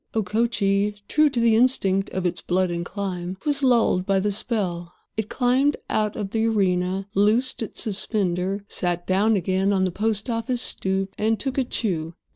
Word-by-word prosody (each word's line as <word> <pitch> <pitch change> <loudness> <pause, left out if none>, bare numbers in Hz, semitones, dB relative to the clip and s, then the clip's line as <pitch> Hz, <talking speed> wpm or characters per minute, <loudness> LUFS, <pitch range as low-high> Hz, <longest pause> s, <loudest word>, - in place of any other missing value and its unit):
Okochee, 210 -1 +1
true 305 0 +3
to 260 -4 -1
the 230 -1 +4
instinct 200 -6 +2
of 185 -1 -3
its 175 - -1
blood 185 0 0
and 170 0 -2
clime, 185 -1 -5
was 290 -1 +2
lulled 235 -8 +3
by 195 0 +1
the 205 +2 0
spell. 185 -5 -3 0.2
It 220 -1 -3
climbed 265 +3 +2
out 215 -1 0
of 200 -3 -4
the 225 0 +1
arena, 190 -2 0
loosed 220 +7 +2
its 225 - -1
suspender, 195 -2 -1
sat 175 -1 -2
down 205 +4 +2
again 190 +1 +1
on 190 -2 +2
the 185 - 0
post 215 +4 -1
office 235 +1 -1
stoop, 190 0 -1
and 220 0 +1
took 265 +2 -3
a - - +3
chew. 170 -9 -3
200 Hz, 175 wpm, -23 LUFS, 185-225 Hz, 0.2 s, the